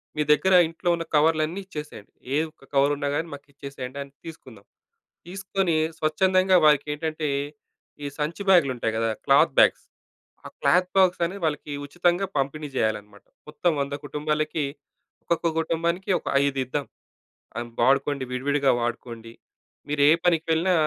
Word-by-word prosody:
మీ 150 Hz, -, 0 dB
దగ్గర 190 Hz, +5 st, +3 dB
ఇంట్లో 165 Hz, +2 st, -3 dB
ఉన్న 165 Hz, -, -4 dB
కవర్లన్నీ 155 Hz, +3 st, +2 dB
ఇచ్చేసేయండి. 150 Hz, -, -9 dB, 0.2 s
ఏ -, -, +3 dB
ఒక్క 155 Hz, -, -25 dB
కవరున్నా 145 Hz, +1 st, +2 dB
కాని 165 Hz, -, -2 dB
మాకిచ్చేసేయండని 140 Hz, -1 st, -8 dB
తీసుకుందాం. 130 Hz, -10 st, -12 dB, 0.6 s
తీసుకొని 190 Hz, -2 st, -1 dB, 0.2 s
స్వచ్ఛందంగా 185 Hz, +4 st, +3 dB
వారికి 150 Hz, -1 st, +4 dB
ఏంటంటే 155 Hz, 0 st, -3 dB, 0.8 s
ఈ -, -, -2 dB
సంచి 160 Hz, +6 st, -3 dB
బ్యాగులు 170 Hz, -8 st, +5 dB
ఉంటాయి 115 Hz, -1 st, -1 dB
కదా! 115 Hz, -, +1 dB, 0.2 s
క్లాత్ -, -, +5 dB
బ్యాగ్స్ -, -, +4 dB, 0.6 s
ఆ -, -, -5 dB
క్లాత్ 180 Hz, +1 st, +3 dB
బాగ్స్ 185 Hz, -2 st, +4 dB
అనేది 190 Hz, +3 st, -6 dB
వాళ్ళకి 150 Hz, -1 st, -2 dB
ఉచితంగా 175 Hz, +4 st, +1 dB
పంపిణీ 145 Hz, +2 st, -2 dB
చేయాలన్నమాట. 105 Hz, -3 st, -2 dB, 0.2 s
మొత్తం 160 Hz, +3 st, 0 dB
100 140 Hz, 0 st, -3 dB
కుటుంబాలకి 150 Hz, +1 st, -2 dB, 0.6 s
ఒక్కొక్క 170 Hz, 0 st, 0 dB
కుటుంబానికి 170 Hz, +3 st, -1 dB
ఒక -, -, -15 dB, 0.2 s
ఐదిద్దాం. 135 Hz, 0 st, -1 dB, 1.0 s
వాడుకోండి, 140 Hz, +2 st, +2 dB
విడివిడిగా 140 Hz, +2 st, +1 dB
వాడుకోండి. 120 Hz, -1 st, -5 dB, 0.6 s
మీరే 145 Hz, 0 st, +3 dB, 0.2 s
పనికి 165 Hz, -2 st, +2 dB
వెళ్ళినా 175 Hz, +3 st, +2 dB
150 Hz, 125 wpm, -25 LUFS, 140-170 Hz, 1.0 s, బ్యాగులు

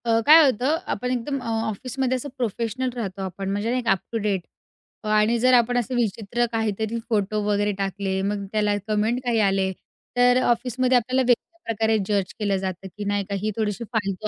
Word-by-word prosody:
अ, 225 Hz, -1 st, +3 dB
काय 315 Hz, +2 st, +9 dB
होतं, 265 Hz, +4 st, +2 dB
आपण 250 Hz, +4 st, -2 dB
एकदम 255 Hz, +3 st, -2 dB
अ, -, -, -7 dB, 0.2 s
ऑफिसमध्ये 255 Hz, +4 st, -2 dB
असं 270 Hz, +3 st, -6 dB
प्रोफेशनल 235 Hz, +2 st, -2 dB
राहतो, 200 Hz, -5 st, -4 dB
आपण 190 Hz, +1 st, -4 dB
म्हणजे 205 Hz, +4 st, -1 dB
ना 250 Hz, -, +1 dB
एक 245 Hz, -2 st, -4 dB
अप 195 Hz, -, +4 dB
टू 230 Hz, -, -1 dB
डेट 205 Hz, -3 st, 0 dB, 0.6 s
अ, -, -, -6 dB
आणि 215 Hz, +2 st, +3 dB
जर 255 Hz, +2 st, +4 dB
आपण 245 Hz, 0 st, +4 dB
असं 245 Hz, +1 st, -1 dB
विचित्र 235 Hz, 0 st, 0 dB
काहीतरी 220 Hz, 0 st, -1 dB
फोटो 210 Hz, -1 st, 0 dB
वगैरे 205 Hz, 0 st, +1 dB
टाकले, 195 Hz, 0 st, -2 dB
मग 200 Hz, 0 st, -2 dB
त्याला 210 Hz, -1 st, +1 dB
कमेंट 215 Hz, +3 st, +1 dB
काही 240 Hz, -2 st, +1 dB
आले, 195 Hz, -1 st, +1 dB, 0.5 s
तर 245 Hz, 0 st, +5 dB
ऑफिसमध्ये 250 Hz, +2 st, +2 dB
आपल्याला 255 Hz, +2 st, +1 dB
वेगवेगळ्या 335 Hz, +8 st, 0 dB
प्रकारे 220 Hz, 0 st, +2 dB
जज 200 Hz, -3 st, 0 dB
केलं 200 Hz, -2 st, +1 dB
जातं, 190 Hz, 0 st, -4 dB
की 205 Hz, +3 st, -8 dB
नाही 205 Hz, 0 st, 0 dB
का 200 Hz, -, -1 dB
ही 215 Hz, +1 st, -1 dB
थोडीशी 215 Hz, +1 st, -1 dB
फालतू 205 Hz, -1 st, -1 dB
220 Hz, 195 wpm, -24 LUFS, 200-245 Hz, 0.6 s, काय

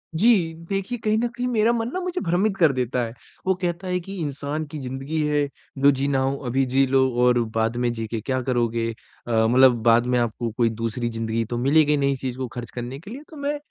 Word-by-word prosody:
जी, 185 Hz, -4 st, +3 dB, 0.2 s
देखिए, 195 Hz, +5 st, -2 dB
कहीं 215 Hz, -1 st, +1 dB
न 240 Hz, -, +1 dB
कहीं 245 Hz, +1 st, -4 dB
मेरा 230 Hz, -1 st, +3 dB
मन 230 Hz, 0 st, -1 dB
ना 370 Hz, -, -1 dB
मुझे 365 Hz, 0 st, -3 dB
भ्रमित 190 Hz, +4 st, +1 dB
कर 165 Hz, -5 st, +5 dB
देता 125 Hz, 0 st, -1 dB
है। 115 Hz, -, -7 dB, 0.3 s
वो 190 Hz, -, +4 dB
कहता 175 Hz, +1 st, -2 dB
है 180 Hz, 0 st, 0 dB
कि 195 Hz, +3 st, -8 dB
इंसान 145 Hz, 0 st, -3 dB
की 155 Hz, -, -5 dB
ज़िंदगी 135 Hz, +4 st, -3 dB
है, 145 Hz, -1 st, +1 dB, 0.3 s
जो 140 Hz, +1 st, +6 dB
जीना 135 Hz, 0 st, 0 dB
हो 135 Hz, +1 st, 0 dB
अभी 135 Hz, +2 st, +1 dB
जी 135 Hz, +2 st, +3 dB
लो 130 Hz, 0 st, +3 dB
और 125 Hz, -1 st, +4 dB, 0.2 s
बाद 110 Hz, +1 st, +1 dB
में 120 Hz, -1 st, +1 dB
जी 115 Hz, -1 st, -4 dB
के 110 Hz, 0 st, -4 dB
क्या 130 Hz, +3 st, -1 dB
करोगे? 115 Hz, -2 st, 0 dB, 0.4 s
अ, 120 Hz, -, -3 dB, 0.2 s
मतलब 130 Hz, +1 st, +6 dB
बाद 115 Hz, +1 st, +5 dB
में 125 Hz, 0 st, +2 dB
आपको 120 Hz, 0 st, -1 dB
कोई 120 Hz, -2 st, +3 dB
दूसरी 115 Hz, +1 st, -3 dB
ज़िंदगी 115 Hz, 0 st, -2 dB
तो 120 Hz, +2 st, -4 dB
मिलेगी 150 Hz, +4 st, +3 dB
नहीं 140 Hz, 0 st, +2 dB
इस 130 Hz, -, -7 dB
चीज़ 130 Hz, -1 st, -3 dB
को 130 Hz, -1 st, -3 dB
खर्च 120 Hz, 0 st, -7 dB
करने 125 Hz, +3 st, -6 dB
के 200 Hz, +6 st, -11 dB
लिए 275 Hz, +4 st, -8 dB
तो 315 Hz, -, -12 dB
मैं 285 Hz, +1 st, -2 dB
135 Hz, 235 wpm, -23 LUFS, 120-180 Hz, 0.4 s, जो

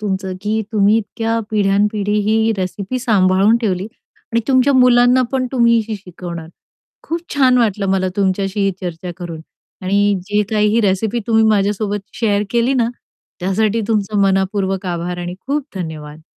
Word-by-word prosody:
तुमचं, 190 Hz, -2 st, -3 dB
की 215 Hz, +1 st, 0 dB
तुम्ही 210 Hz, 0 st, +4 dB
इतक्या 225 Hz, +1 st, -2 dB
पिढ्यान 205 Hz, -1 st, +2 dB
पिढी 210 Hz, 0 st, 0 dB
ही 220 Hz, +1 st, +2 dB
रेसिपी 195 Hz, +6 st, -3 dB
सांभाळून 200 Hz, -2 st, +3 dB
ठेवली. 195 Hz, -5 st, -1 dB, 0.5 s
आणि 230 Hz, -, +2 dB
तुमच्या 260 Hz, +1 st, +4 dB
मुलांना 250 Hz, 0 st, +5 dB
पण 260 Hz, -1 st, 0 dB
तुम्ही 235 Hz, -2 st, +3 dB
शि 220 Hz, -2 st, -4 dB
शिकवणार 175 Hz, -3 st, -8 dB, 0.5 s
खूप 335 Hz, +1 st, -3 dB
छान 255 Hz, -3 st, +4 dB
वाटलं 210 Hz, -4 st, +1 dB
मला 185 Hz, -1 st, +1 dB
तुमच्याशी 195 Hz, 0 st, 0 dB
चर्चा 180 Hz, -1 st, -5 dB
करून 170 Hz, -3 st, -7 dB, 0.4 s
आणि 200 Hz, +2 st, +2 dB
जे 210 Hz, 0 st, +2 dB
काही 210 Hz, -1 st, +2 dB
ही 235 Hz, -, +4 dB
रेसिपी 210 Hz, +3 st, 0 dB
तुम्ही 225 Hz, -1 st, +3 dB
माझ्यासोबत 205 Hz, -1 st, +1 dB, 0.2 s
शेअर 205 Hz, -3 st, +1 dB
केली 240 Hz, +3 st, +1 dB
ना, 235 Hz, -3 st, +2 dB, 0.5 s
त्यासाठी 210 Hz, +4 st, 0 dB
तुमचं 210 Hz, -2 st, 0 dB
मनःपूर्वक 195 Hz, 0 st, 0 dB
आभार 175 Hz, 0 st, -3 dB
आणि 175 Hz, 0 st, -5 dB
खूप 285 Hz, +1 st, -1 dB
धन्यवाद. 155 Hz, -3 st, -7 dB
205 Hz, 150 wpm, -18 LUFS, 190-225 Hz, 0.5 s, मुलांना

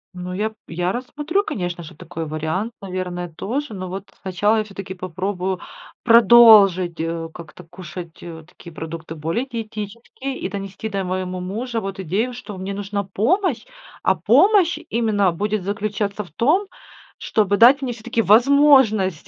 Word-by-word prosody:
Ну 180 Hz, 0 st, -6 dB
я, 215 Hz, +4 st, -2 dB
я 175 Hz, +2 st, -1 dB
рассмотрю, 295 Hz, -, -2 dB
конечно 175 Hz, -, -4 dB
же, 155 Hz, -, -12 dB
такой 165 Hz, +1 st, -7 dB
вариант, 160 Hz, +8 st, -2 dB
наверное, 180 Hz, -2 st, -4 dB
тоже. 260 Hz, -, -3 dB
Но 185 Hz, -2 st, -6 dB
вот, 195 Hz, +2 st, -7 dB
сначала 205 Hz, +4 st, +1 dB
я 215 Hz, -, +1 dB
всё-таки 195 Hz, -2 st, -8 dB
попробую 185 Hz, +1 st, -3 dB, 0.4 s
продолжить, 215 Hz, -7 st, +7 dB
э, 165 Hz, 0 st, -3 dB
как-то 165 Hz, -3 st, -11 dB
кушать, 170 Hz, 0 st, -10 dB
э, 165 Hz, -2 st, -9 dB
такие 170 Hz, -, -14 dB
продукты, 160 Hz, 0 st, -7 dB
более 165 Hz, -, -2 dB
диетические, 230 Hz, +3 st, -6 dB
и -, -, -3 dB
донести 195 Hz, +1 st, -6 dB
до 200 Hz, -2 st, -2 dB
моему 185 Hz, 0 st, -3 dB
мужа 225 Hz, +6 st, -3 dB
вот 195 Hz, -1 st, -6 dB
идею, 200 Hz, +8 st, -1 dB
что 240 Hz, -4 st, -8 dB
мне 195 Hz, +1 st, -4 dB
нужна 200 Hz, 0 st, -3 dB
помощь, 260 Hz, -, 0 dB, 0.4 s
а -, -, +4 dB
помощь 385 Hz, -5 st, +4 dB
именно 215 Hz, -5 st, +2 dB
будет 205 Hz, +3 st, -2 dB
заключаться 205 Hz, +1 st, -2 dB
в 175 Hz, -, -17 dB
том, 300 Hz, -, +2 dB, 0.5 s
чтобы 205 Hz, -2 st, +1 dB
дать 255 Hz, +6 st, +7 dB
мне 260 Hz, -2 st, -2 dB
всё-таки 230 Hz, 0 st, -2 dB
возможность, 230 Hz, -, +4 dB
200 Hz, 150 wpm, -21 LUFS, 180-230 Hz, 0.5 s, продолжить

